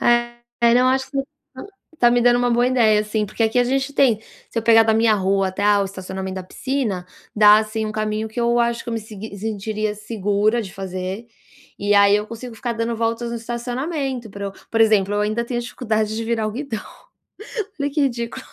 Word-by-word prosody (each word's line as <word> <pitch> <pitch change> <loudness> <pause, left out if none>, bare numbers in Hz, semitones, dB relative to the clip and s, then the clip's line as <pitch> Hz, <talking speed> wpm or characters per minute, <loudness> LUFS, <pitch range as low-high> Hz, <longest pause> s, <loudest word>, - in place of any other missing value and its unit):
É. 240 0 +1
Não, 250 +1 +4
acho 265 +1 +1
que 275 - -6
você - - +2 0.3
tá - - -8 0.3
tá 240 -1 +5
me 245 0 +3
dando 240 0 +5
uma 245 0 +1
boa 240 +1 +3
ideia 220 -5 +3
sim, 215 0 -1
porque 215 +3 -3
aqui 225 +2 +2
a 245 - +4
gente 270 +2 -1
tem 240 -7 +3 0.3
Se 230 - -2
eu - - -1
pegar 225 -1 +6
da 220 0 +2
minha 225 0 +4
rua 195 -1 +1
até, 190 +2 -4
ah, 205 -1 +4
o - - +1
estacionamento 190 0 -6
da 185 - -4
piscina, 215 -4 -3 0.3
dá 210 0 +8
assim 220 0 -2
um 215 - -4
caminho 215 0 -2
que 240 +2 -4
eu 235 0 +2
acho 235 0 +1
que - - -10
eu 235 - -2
me 225 - -1
segui 215 -1 -9
sentiria 215 0 -3
segura 210 +1 0
de 195 -3 -7
fazer, 190 +3 -5 0.5
e 205 +1 +1
aí 200 0 +6
eu 210 - -3
consigo 230 +1 -8
ficar 240 0 -3
dando 230 0 -2
voltas 230 +1 -1
no 235 - -3
estacionamento 250 +2 -3
para 200 0 -7
eu 195 - -5 0.2
Por 225 - 0
exemplo, 205 -2 +4
eu 205 - +1
ainda 215 +3 0
tenho 240 0 -2
dificuldade 220 -3 -2
de 225 - -3
virar 225 -1 0
o - - -2
guidão. 240 -1 -4 1.0
Olha 285 0 0
que 300 - -1
ridículo. 250 0 -2
225 Hz, 225 wpm, -21 LUFS, 210-240 Hz, 1.0 s, dá